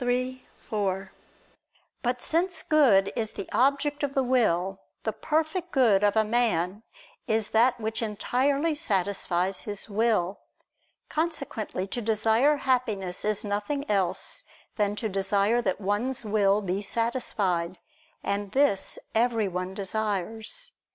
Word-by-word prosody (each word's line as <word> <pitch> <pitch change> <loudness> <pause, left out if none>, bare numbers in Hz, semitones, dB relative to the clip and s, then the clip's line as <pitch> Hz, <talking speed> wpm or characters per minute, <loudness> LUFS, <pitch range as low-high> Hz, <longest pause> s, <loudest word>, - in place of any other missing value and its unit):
3, 255 +1 -1
4). 195 -2 -3 0.9
But 245 -1 -1
since 350 +3 +2
good 210 -11 +4
is 220 -2 -2
the 195 - -6
object 280 +2 +2
of 285 -2 -1
the 270 - +3
will, 195 -7 +1 0.2
the 220 - -1
perfect 320 +3 -1
good 225 -7 +4
of 205 0 +3
a 220 0 +3
man 210 -4 +1 0.5
is 220 -1 +1
that 240 +2 +3
which 220 +1 -2
entirely 270 +8 0
satisfies 195 - 0
his 205 -1 -4
will. 205 -4 +1 0.7
Consequently 275 - -2
to 240 +5 -4
desire 225 +6 +3
happiness 220 -9 0
is 215 +1 0
nothing 210 +8 -2
else 190 -3 0 0.3
than 205 -1 0
to 220 - -2
desire 200 +3 +1
that 190 -5 -1
one's 220 +5 0
will 205 -1 +2
be 190 +1 -1
satisfied. 205 -6 -1 0.5
And 200 0 -2
this 270 -8 +2 0.2
everyone 205 -6 0
desires. 215 - -1
220 Hz, 125 wpm, -27 LUFS, 195-255 Hz, 0.9 s, good